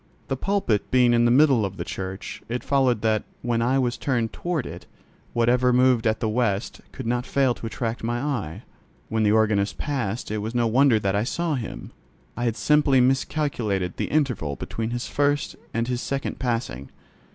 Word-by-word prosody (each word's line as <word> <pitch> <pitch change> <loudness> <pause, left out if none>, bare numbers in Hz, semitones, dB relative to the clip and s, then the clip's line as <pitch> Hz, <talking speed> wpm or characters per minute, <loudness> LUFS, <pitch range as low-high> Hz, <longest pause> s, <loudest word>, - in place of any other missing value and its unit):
The 135 - 0
pulpit 160 - 0
being 125 -2 +4
in 120 0 +4
the - - +4
middle 130 -2 +5
of 95 -1 -4
the - - -3
church, 95 +1 -6
it 125 +1 -3
followed 130 -5 +2
that, 110 -1 +2 0.2
when 120 -1 0
I 125 +3 +2
was 125 -2 0
turned 120 -5 -1
toward 170 -7 -2
it, - - -9 0.5
whatever 125 +2 +3
moved 125 -2 +4
at 110 0 +1
the 110 - -1
west 110 -2 -1
end - - -31
could 130 - -7
not 120 +1 0
fail 135 -1 +2
to 115 - -7
attract 115 0 -4
my 120 +1 -1
eye. 120 - -3 0.5
When 110 0 0
the 105 -1 +3
organist 105 -3 +2
passed 120 -8 -3
it 110 - -1
was 110 +3 -4
no 120 -1 +2
wonder 125 +1 +4
that 100 -1 0
I 105 - +1
saw 170 +6 -1
him: 125 -5 -5 0.4
I 120 - -2
had 115 -2 0
simply 150 -3 +4
miscalculated 125 - 0
the - - -1
interval 125 - 0
between 110 - -4
his 120 +1 -3
first 145 0 0 0.2
and 115 +1 -1
his 125 -1 -2
second 135 0 -3
passing. 115 - -2
120 Hz, 195 wpm, -24 LUFS, 110-130 Hz, 0.5 s, middle